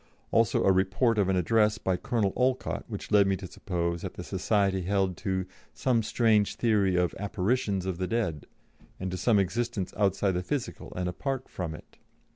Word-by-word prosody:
Also 115 Hz, -1 st, +3 dB
a 95 Hz, -, +5 dB
report 100 Hz, +5 st, +2 dB
of 95 Hz, -2 st, +2 dB
an 95 Hz, -, +2 dB
address 105 Hz, +4 st, +3 dB
by 95 Hz, -, 0 dB
Colonel 105 Hz, 0 st, 0 dB
Olcott, 130 Hz, 0 st, 0 dB
which 105 Hz, -3 st, -7 dB
led 100 Hz, -2 st, +5 dB
me 95 Hz, -, +2 dB
to 95 Hz, -, -8 dB
suppose 85 Hz, -2 st, -3 dB
that -, -, -6 dB
the -, -, -6 dB
society 100 Hz, -3 st, +1 dB
held 95 Hz, 0 st, 0 dB
to 95 Hz, -1 st, -2 dB, 0.3 s
"some 125 Hz, -3 st, +2 dB
strange 110 Hz, -2 st, +2 dB
theory 105 Hz, -5 st, +2 dB
of 90 Hz, -1 st, +1 dB
'apparitions' 100 Hz, -1 st, 0 dB
of 95 Hz, -2 st, -3 dB
the 95 Hz, -, -1 dB
dead, 105 Hz, -10 st, -2 dB, 0.5 s
and 95 Hz, 0 st, -3 dB
to 90 Hz, -, -3 dB
some 110 Hz, +2 st, +3 dB
existence 100 Hz, +1 st, -1 dB
outside 100 Hz, 0 st, +2 dB
the 90 Hz, -1 st, -1 dB
physical 140 Hz, +6 st, -4 dB
and 90 Hz, 0 st, -2 dB
apart 130 Hz, +8 st, -3 dB
from 85 Hz, -4 st, -5 dB
it." -, -, -16 dB
100 Hz, 185 wpm, -28 LUFS, 90-115 Hz, 0.5 s, a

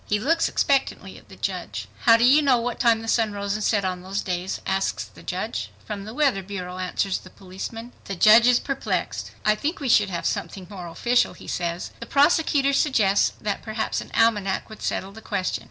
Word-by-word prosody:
He 210 Hz, -, +1 dB
looks 330 Hz, +9 st, +1 dB
expectantly 275 Hz, -1 st, 0 dB
at -, -, -24 dB
the -, -, -12 dB
judge. -, -, -4 dB, 0.2 s
"How 230 Hz, -1 st, +8 dB
do 230 Hz, -, +1 dB
you 275 Hz, +5 st, +6 dB
know 270 Hz, -4 st, +4 dB
what 240 Hz, 0 st, -3 dB
time 230 Hz, -3 st, +3 dB
the -, -, -7 dB
sun 225 Hz, -2 st, +1 dB
rose 200 Hz, 0 st, -2 dB
and 215 Hz, 0 st, -3 dB
set 205 Hz, -3 st, +1 dB
on 180 Hz, -1 st, -2 dB
those 195 Hz, +2 st, -3 dB
days?" 180 Hz, 0 st, -3 dB
asks 190 Hz, 0 st, -1 dB
the -, -, -15 dB
judge. -, -, -4 dB, 0.2 s
"From 205 Hz, -2 st, -6 dB
the 215 Hz, -, -8 dB
weather 275 Hz, -9 st, +2 dB
bureau," 185 Hz, -2 st, -6 dB
answers 185 Hz, +1 st, -1 dB
the 185 Hz, -, -14 dB
policeman. 195 Hz, +6 st, -8 dB
The 195 Hz, -, -4 dB
judge 220 Hz, +6 st, +7 dB
is 250 Hz, -1 st, +5 dB
perplexed. 275 Hz, -1 st, -3 dB, 0.2 s
"I 215 Hz, -, +5 dB
think 300 Hz, -, -3 dB
we 275 Hz, -4 st, -3 dB
should 210 Hz, -4 st, +4 dB
have 175 Hz, -2 st, -4 dB
something 190 Hz, -2 st, -3 dB
more 180 Hz, -3 st, -7 dB
official," 240 Hz, +9 st, +1 dB
he -, -, -14 dB
says. 170 Hz, 0 st, -3 dB
The 235 Hz, -, -8 dB
prosecutor 285 Hz, -1 st, +3 dB
suggests 215 Hz, -9 st, +3 dB
that 205 Hz, -1 st, -2 dB
perhaps 220 Hz, 0 st, -2 dB
an -, -, -10 dB
almanac 210 Hz, -4 st, +1 dB
would 220 Hz, -, -11 dB
settle 190 Hz, -, -2 dB
the 220 Hz, +2 st, -12 dB
question. 200 Hz, -4 st, -2 dB
215 Hz, 210 wpm, -24 LUFS, 190-245 Hz, 0.2 s, How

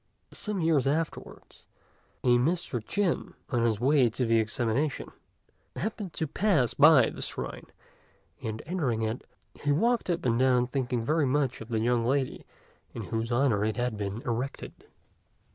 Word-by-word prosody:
Some 210 Hz, -4 st, -2 dB
years 155 Hz, -5 st, +2 dB
afterwards, 155 Hz, +3 st, -4 dB, 0.6 s
a 125 Hz, -, +2 dB
Mr. 140 Hz, -4 st, -1 dB
Chin, 195 Hz, -, -1 dB, 0.2 s
on 120 Hz, -3 st, +1 dB
his 110 Hz, -3 st, +1 dB
way 130 Hz, 0 st, +4 dB
to 125 Hz, +3 st, -1 dB
the 115 Hz, 0 st, +3 dB
examination, 120 Hz, +6 st, -1 dB, 0.6 s
happened 205 Hz, -4 st, -4 dB
to 160 Hz, -, -2 dB
pass 155 Hz, -, +2 dB
by 150 Hz, -1 st, +6 dB
the -, -, -8 dB
shrine; -, -, -4 dB, 0.7 s
and 110 Hz, 0 st, -5 dB
entering 140 Hz, -11 st, -1 dB
in, 110 Hz, +2 st, -2 dB, 0.3 s
he 145 Hz, -, -2 dB
walked 230 Hz, +9 st, +1 dB
up 170 Hz, -5 st, -1 dB
and 120 Hz, -1 st, +2 dB
down 125 Hz, -1 st, +4 dB
thinking 125 Hz, -3 st, -2 dB
very 155 Hz, +1 st, +2 dB
much 135 Hz, -2 st, 0 dB
of 110 Hz, -, -8 dB
the 115 Hz, -, -1 dB
young 120 Hz, +1 st, +2 dB
lady 130 Hz, +2 st, -1 dB, 0.5 s
in -, -, -4 dB
whose 115 Hz, +1 st, -1 dB
honour 120 Hz, -4 st, +2 dB
it 110 Hz, -1 st, 0 dB
had 120 Hz, -1 st, -1 dB
been 105 Hz, +2 st, -4 dB
erected. 125 Hz, +3 st, -5 dB
130 Hz, 155 wpm, -28 LUFS, 115-155 Hz, 0.7 s, by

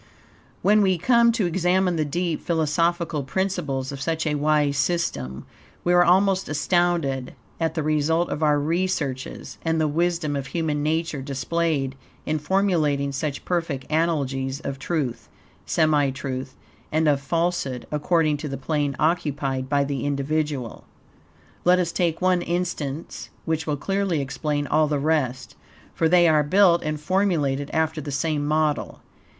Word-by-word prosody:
When 210 Hz, +1 st, +5 dB
we 190 Hz, -2 st, +3 dB
come 235 Hz, +5 st, +4 dB
to 225 Hz, -4 st, 0 dB
examine 180 Hz, +1 st, +1 dB
the 155 Hz, -, +1 dB
deep, 165 Hz, +2 st, -2 dB
philosophical 165 Hz, 0 st, 0 dB
principles 145 Hz, -4 st, -2 dB
of 135 Hz, -1 st, -7 dB
such 165 Hz, +2 st, -1 dB
a 150 Hz, -, 0 dB
wise 150 Hz, -1 st, +2 dB
system, 75 Hz, -, -1 dB, 0.4 s
we 175 Hz, -, +2 dB
are 175 Hz, 0 st, +6 dB
almost 190 Hz, +2 st, +3 dB
astounded 150 Hz, -5 st, 0 dB, 0.2 s
at 165 Hz, -1 st, -1 dB
the 160 Hz, -, -1 dB
result 155 Hz, +3 st, +1 dB
of 150 Hz, -, -3 dB
our 150 Hz, -1 st, +3 dB
researches 155 Hz, -4 st, -2 dB
and 160 Hz, -1 st, +1 dB
the 155 Hz, -, +2 dB
wisdom 165 Hz, -1 st, 0 dB
of 140 Hz, -1 st, -3 dB
human 150 Hz, 0 st, -1 dB
nature 160 Hz, -1 st, -1 dB
displayed 140 Hz, +1 st, -1 dB, 0.3 s
in 155 Hz, 0 st, -1 dB
formulating 150 Hz, -5 st, +1 dB
such 140 Hz, +1 st, -4 dB
perfect 165 Hz, -7 st, -1 dB
analogies 140 Hz, -5 st, 0 dB
of 135 Hz, -1 st, -5 dB
truth, 130 Hz, -9 st, -3 dB, 0.4 s
semi 150 Hz, -3 st, +3 dB
truth, 130 Hz, -1 st, -5 dB, 0.4 s
and 155 Hz, +1 st, +2 dB
of 140 Hz, -2 st, +3 dB
falsehood, 165 Hz, -4 st, -1 dB
according 155 Hz, 0 st, +1 dB
to 150 Hz, 0 st, -5 dB
the 135 Hz, -, -4 dB
plane 145 Hz, 0 st, -1 dB
occupied 145 Hz, -5 st, 0 dB
by 140 Hz, 0 st, +2 dB
the 140 Hz, -3 st, -3 dB
individual. 145 Hz, -3 st, -2 dB, 0.8 s
Let 180 Hz, +1 st, +5 dB
us 175 Hz, -2 st, 0 dB
take 170 Hz, 0 st, -1 dB
one 185 Hz, -1 st, +3 dB
instance, 170 Hz, -4 st, -3 dB, 0.2 s
which 160 Hz, -1 st, -1 dB
will 150 Hz, -1 st, 0 dB
clearly 195 Hz, 0 st, 0 dB
explain 145 Hz, +1 st, -2 dB
all 155 Hz, +1 st, +2 dB
the 150 Hz, -1 st, 0 dB
rest, 140 Hz, -4 st, -1 dB, 0.4 s
for 160 Hz, -, +1 dB
they 175 Hz, 0 st, +5 dB
are 155 Hz, -2 st, +4 dB
built 175 Hz, +3 st, +4 dB
and 155 Hz, -1 st, -3 dB
formulated 150 Hz, -6 st, 0 dB
after 160 Hz, -1 st, 0 dB
the 145 Hz, -, -6 dB
same 150 Hz, +1 st, -1 dB
model. 155 Hz, 0 st, 0 dB
155 Hz, 150 wpm, -24 LUFS, 140-170 Hz, 0.8 s, are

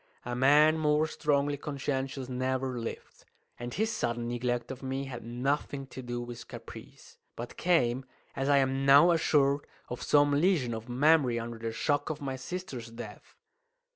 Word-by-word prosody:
A 120 Hz, 0 st, -3 dB
man 150 Hz, +5 st, +5 dB
more 150 Hz, 0 st, +3 dB
strongly 145 Hz, -2 st, 0 dB
conscientious 135 Hz, -2 st, -3 dB
never 130 Hz, 0 st, -2 dB
lived; 115 Hz, -, -7 dB, 0.4 s
and 120 Hz, 0 st, -5 dB
his 220 Hz, -, 0 dB
sudden 120 Hz, -, -2 dB
neglect 120 Hz, 0 st, -2 dB
of 130 Hz, -, -8 dB
me 135 Hz, 0 st, -3 dB
had 130 Hz, -3 st, -7 dB
nothing 135 Hz, +3 st, -2 dB
to 130 Hz, 0 st, -9 dB
do 120 Hz, -1 st, -4 dB
with 120 Hz, -1 st, -9 dB
caprice, -, -, -12 dB, 0.2 s
but 120 Hz, +1 st, -7 dB
came 130 Hz, -7 st, +1 dB, 0.3 s
as 135 Hz, +1 st, -1 dB
I 140 Hz, -, +5 dB
am 135 Hz, 0 st, +1 dB
now 140 Hz, +6 st, +7 dB
assured 145 Hz, -3 st, +2 dB, 0.2 s
of 125 Hz, -, -5 dB
some 145 Hz, 0 st, +4 dB
lesion 145 Hz, -5 st, +2 dB
of 115 Hz, +2 st, -7 dB
memory 135 Hz, -1 st, +3 dB
under 115 Hz, 0 st, -6 dB
the 115 Hz, 0 st, -3 dB
shock 145 Hz, +6 st, 0 dB
of 155 Hz, -1 st, -3 dB
my 135 Hz, -2 st, -3 dB
sister's 130 Hz, -3 st, -6 dB
death. 115 Hz, -2 st, -10 dB
135 Hz, 165 wpm, -30 LUFS, 120-145 Hz, 0.4 s, now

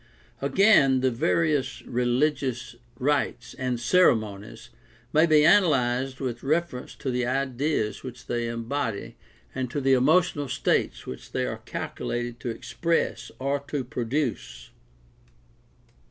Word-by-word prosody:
Again, 140 Hz, -4 st, +4 dB
the 130 Hz, 0 st, +2 dB
various 150 Hz, +4 st, 0 dB
religious 125 Hz, 0 st, -1 dB, 0.2 s
rites 130 Hz, -3 st, -1 dB
and 125 Hz, -2 st, -2 dB
ceremonies 115 Hz, -, +1 dB, 0.4 s
may 155 Hz, +2 st, +5 dB
be 155 Hz, -1 st, +5 dB
analyzed 135 Hz, -8 st, +3 dB
with 120 Hz, -3 st, -4 dB
reference 155 Hz, -3 st, -2 dB
to 135 Hz, -, -3 dB
the 125 Hz, 0 st, 0 dB
ideas 130 Hz, -3 st, -1 dB
which 125 Hz, -1 st, -9 dB
they 120 Hz, -1 st, -2 dB
embody 115 Hz, -1 st, -3 dB, 0.4 s
and 130 Hz, -1 st, -3 dB
to 145 Hz, -, -2 dB
the 135 Hz, -1 st, +3 dB
emotional 145 Hz, +2 st, +3 dB
states 125 Hz, -, 0 dB
which 65 Hz, -, -9 dB
they -, -, 0 dB
are -, -, -5 dB
calculated 120 Hz, 0 st, -4 dB
to 120 Hz, -, -4 dB
express 165 Hz, +8 st, -2 dB
or 140 Hz, +2 st, -1 dB
to 145 Hz, -3 st, -2 dB
produce. 120 Hz, -, -3 dB
130 Hz, 120 wpm, -26 LUFS, 120-145 Hz, 0.4 s, may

